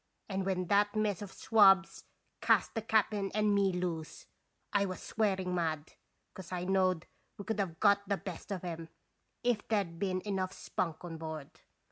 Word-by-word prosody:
And 195 -1 -2
when 185 -1 0
that 205 +3 +3
mess 210 -2 0
of 200 -2 -6
swabs 195 -4 +4 0.4
cast - - +3
the 225 - -2
cap'n 210 -2 +1
and 210 -1 +3
me 200 -1 +3
loose, 175 -3 -4 0.5
I 205 -1 +4
was 185 -2 -3
swearing 190 -4 0
mad, 160 -4 -2 0.4
'cause 185 -2 -10
I 180 -1 -2
knowed 185 -2 +2 0.3
we 200 - -7
could 220 -1 -2
have 175 -5 -2
got 200 -1 +3
the 200 - +2
best 185 +1 -8
of 185 -3 -3
'em, 165 -1 -5 0.5
if 240 -3 +1
there 210 -3 +2
'd 170 -2 -12
been 185 -1 0
enough 190 -2 -2
spunk 165 -1 -3
on 165 -2 -6
board. 160 -3 -6
190 Hz, 175 wpm, -32 LUFS, 175-205 Hz, 0.5 s, swabs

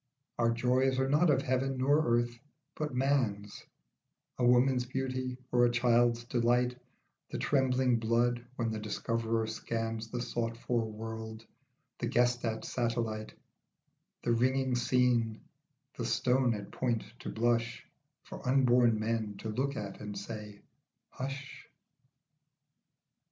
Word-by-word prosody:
Our 115 -1 +4
joys 125 +3 +2
are 130 0 +2
not 150 +5 +4
of 135 -2 +3
heaven 130 +1 0
nor 145 +4 +3
earth, 120 0 -2 0.3
but 150 -4 -4
man's, 120 -7 0 0.8
A - - +1
woman's 125 +1 +4
beauty, 130 0 -3
or 120 0 +4
a 120 - +5
child's 120 -1 +3
delight, 120 +1 +1 0.5
The - - -4
trembling 130 -3 +2
blood 120 +2 +1
when 115 -2 -1
the 110 - -3
discoverer 115 +1 -1
scans 115 0 -3
The 120 - -3
sought 115 -1 -2
for 115 -2 -1
world, 110 0 -7 0.5
the - - -1
guessed 120 0 +2
at 110 -1 -2
satel 120 -1 0
lite; 110 -1 -5 0.9
The 120 - +2
ringing 130 +2 +2
scene, 120 -2 +2 0.6
the - - -3
stone 125 -2 +2
at 100 -1 -8
point 120 -3 -1 0.2
to - - -6
blush 115 0 0 0.4
For - - -9
unborn 125 -4 +4
men 110 -2 -2
to 110 - -5
look 135 +5 -1
at 100 -4 -5
and 105 -1 -6
say 105 -2 -7 0.5
"Hush.' 135 +1 -6
120 Hz, 130 wpm, -31 LUFS, 115-130 Hz, 0.9 s, a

